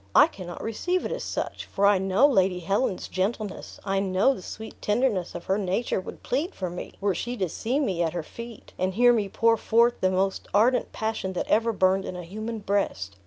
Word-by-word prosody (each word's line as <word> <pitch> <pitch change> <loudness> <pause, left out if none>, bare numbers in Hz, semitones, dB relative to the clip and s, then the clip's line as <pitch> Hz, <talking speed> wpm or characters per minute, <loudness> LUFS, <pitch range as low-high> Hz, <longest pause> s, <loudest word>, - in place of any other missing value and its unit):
I - - +9
cannot 175 -2 -8
receive 355 +12 -1
it - - -3
as - - -3
such, - - -4
for 200 - 0
I 200 -1 +5
know 195 +7 +3
Lady 190 -9 +3
Helen's 195 +3 0
gentleness, 200 +2 -3
I 195 -1 +1
know 195 +6 +3
the 195 - -8
sweet 220 +4 -9
tenderness 210 -5 0
of 175 - -6
her 195 +2 +1
nature 195 +1 -1
would - - -10
plead 300 +10 -1
for 185 -3 -3
me, 180 - -7
were 200 -1 +1
she 240 +7 -4
to 185 - 0
see 240 - -1
me 190 - 0
at 165 -2 0
her 175 -2 -3
feet, 235 +7 -10
and 185 0 0
hear 245 +2 +6
me 210 -4 0
pour 230 +3 +3
forth 235 +2 +3
the 185 - +3
most 190 +1 0
ardent 240 +5 +3
passion 220 -4 -3
that 180 - -2
ever 230 +2 +3
burned 190 -1 +2
in - - -5
a 180 - -6
human 215 +6 -5
breast. 195 - -1
200 Hz, 215 wpm, -26 LUFS, 185-230 Hz, -, I